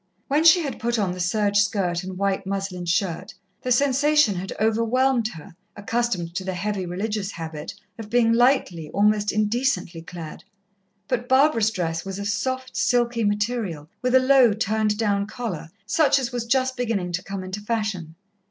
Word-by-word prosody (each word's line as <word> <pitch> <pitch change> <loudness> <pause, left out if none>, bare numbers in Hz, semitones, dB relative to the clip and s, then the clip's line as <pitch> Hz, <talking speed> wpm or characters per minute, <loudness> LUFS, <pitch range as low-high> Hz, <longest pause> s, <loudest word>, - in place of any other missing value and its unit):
When 295 +3 +2
she 335 +1 +7
had 280 - -5
put 235 +1 0
on 200 -4 0
the 180 - -6
serge 205 +3 +1
skirt 185 -5 0
and 185 0 -7
white 195 0 -1
muslin 195 -2 -3
shirt, 175 -1 -1 0.3
the 255 - -3
sensation 285 -1 +3
had 190 +1 -5
overwhelmed 230 +3 +2
her, 160 +1 -12 0.2
accustomed 205 -5 -2
to 190 - -3
the 190 -1 -3
heavy 195 0 -3
religious 200 +3 -3
habit, 160 -2 -7 0.2
of 215 -2 -7
being 230 -1 +3
lightly, 230 - +2
almost 210 0 +3
indecently 215 -5 0
clad. 165 -2 -9 0.6
But 245 -1 -2
Barbara's 260 -5 +4
dress 165 -5 -3
was 195 0 -6
of 200 0 -3
soft, 260 +5 -2
silky 240 -2 +1
material, 205 -7 -1
with 250 0 +1
a - - +8
low, 260 -3 +5
turned 215 0 0
down 200 -2 0
collar, 215 -9 -5 0.2
such 275 +6 +3
as 255 -3 -2
was 240 -2 -3
just 260 +1 +1
beginning 220 -8 -2
to 180 +1 -3
come 195 -1 -5
into 185 +2 -6
fashion. 210 -7 -3
210 Hz, 170 wpm, -23 LUFS, 185-245 Hz, 0.6 s, a